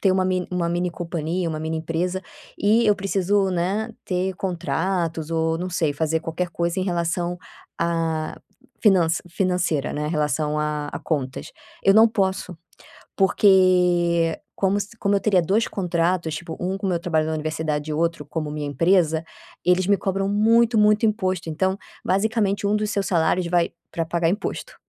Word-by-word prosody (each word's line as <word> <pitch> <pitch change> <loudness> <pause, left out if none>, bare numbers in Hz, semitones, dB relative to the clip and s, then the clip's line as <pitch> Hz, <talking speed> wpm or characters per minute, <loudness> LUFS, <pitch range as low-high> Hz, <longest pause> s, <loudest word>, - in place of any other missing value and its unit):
ter 195 - +3
uma 185 0 +2
min 185 -1 0
uma 180 -2 -1
mini 175 +1 -1
companhia, 170 0 -3
uma 155 -1 -3
mini 160 +1 -2
empresa 170 +4 -2 0.4
e 220 +3 +3
eu 210 - +5
preciso, 195 0 +1
né, 190 +6 -1
ter 185 0 -1
contratos 170 -3 -2
ou 160 0 +1
não 180 +2 -3
sei 165 -4 0
fazer 160 +2 0
qualquer 165 +2 -3
coisa 170 +2 -1
em 185 - -1
relação 175 0 -1 0.4
à 165 -2 -1 0.4
finança 180 -6 +3
financeira, 180 -5 0
né, 150 0 -2
em - - -2
relação 150 -1 0
a 150 -1 -2
a - - -4
contas, 135 -5 -3 0.3
eu 195 - +6
não 220 +2 +7
posso. 190 -4 -1 0.6
Porque 180 -4 +3 0.2
como 195 +1 +1
se 210 +3 -7
como 200 -1 +1
eu - - +2
teria 195 -3 +3
2 200 +7 +1
contratos, 170 -2 0
tipo 165 0 -7
um 185 +2 -2
com 195 0 -3
meu 175 -2 0
trabalho 160 -3 0
na 160 - -1
universidade 155 -1 -2
e - - -1
outro 165 -1 -1
como 155 +1 -4
minha 150 -1 -4
empresa, 160 +2 +2 0.4
eles 180 +1 +3
me 200 - +4
cobram 195 0 -1
muito, 225 +3 +3
muito 210 +1 +4
imposto, 185 -6 -1
então 190 +5 0 0.3
basicamente 205 +1 +1
um 205 - +2
dos 210 0 -1
seus 200 -1 -1
salários 175 0 +1
vai 175 -1 +1 0.2
pra 165 - -2
pagar 170 0 +1
imposto. 200 +5 -4
175 Hz, 170 wpm, -23 LUFS, 160-195 Hz, 0.6 s, não